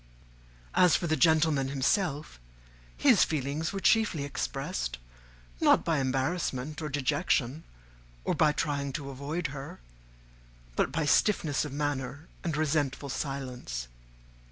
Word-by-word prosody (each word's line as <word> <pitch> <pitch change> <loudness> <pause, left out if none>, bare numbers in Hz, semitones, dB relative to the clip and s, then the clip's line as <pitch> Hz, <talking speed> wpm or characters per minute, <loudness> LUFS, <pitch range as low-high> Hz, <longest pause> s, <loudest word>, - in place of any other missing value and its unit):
As 180 -2 +5
for 175 - 0
the 155 -1 +2
gentleman 155 -2 +3
himself, 145 - 0 0.6
his 65 - +5
feelings 150 +1 -1
were 195 - -3
chiefly 210 -8 +3
expressed, - - -3 0.6
not - - +4
by 160 -3 +2
embarrassment 135 +2 -1
or 155 - -3
dejection, 145 0 0 0.6
or - - 0
by 155 - +4
trying 140 -2 -2
to 140 0 -5
avoid 145 +6 -4
her, 140 - -8 1.0
but - - +1
by 160 -1 0
stiffness 155 -3 +2
of 145 - -6
manner 145 +1 -3 0.2
and 160 -3 -1
resentful 145 -2 0
silence. 125 - -4
145 Hz, 120 wpm, -29 LUFS, 135-155 Hz, 1.0 s, As